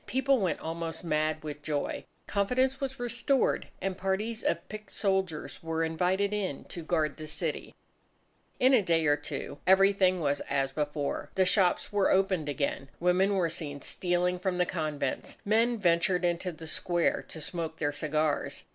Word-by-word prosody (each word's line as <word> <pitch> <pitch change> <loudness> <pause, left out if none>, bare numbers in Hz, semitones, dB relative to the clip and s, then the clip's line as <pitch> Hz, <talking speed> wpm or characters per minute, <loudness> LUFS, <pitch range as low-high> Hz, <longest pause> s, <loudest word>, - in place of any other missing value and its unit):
People 265 +1 +2
went 185 -6 0
almost 165 0 -4
mad 155 -1 0
with 150 -1 -6
joy. 150 -1 -2 0.2
Confidence 255 +7 +1
was 265 -2 -3
restored; 245 +3 +1 0.2
and 190 -1 -1
parties 195 +4 -2
of 170 - -1
picked 215 0 -8
soldiers 190 -6 -1
were 165 0 -1
invited 180 +5 +1
in 190 -9 -2
to 170 - -5
guard 155 -2 0
the 155 - -7
city. 155 - -3 0.8
In 260 +2 +5
a 245 - +6
day 165 -4 +2
or 145 0 +5
two 145 0 -6
everything 190 -1 +5
was 145 -3 +1
as 135 -1 +1
before. 145 0 -2
The 190 - +4
shops 185 +1 +2
were 200 -2 +3
opened 190 -5 +2
again. 140 -1 -2
Women 185 +3 +3
were 180 -3 +2
seen 150 -4 -5
stealing 180 0 0
from 185 0 -1
the 180 - +3
convents. 155 -5 -3
Men 230 +3 +3
ventured 180 -1 +2
into 175 +1 0
the 160 0 -10
square 170 +2 +1
to 160 - -7
smoke 160 +1 -4
their 145 -1 -1
cigars. 155 0 -1
175 Hz, 165 wpm, -29 LUFS, 155-195 Hz, 0.8 s, a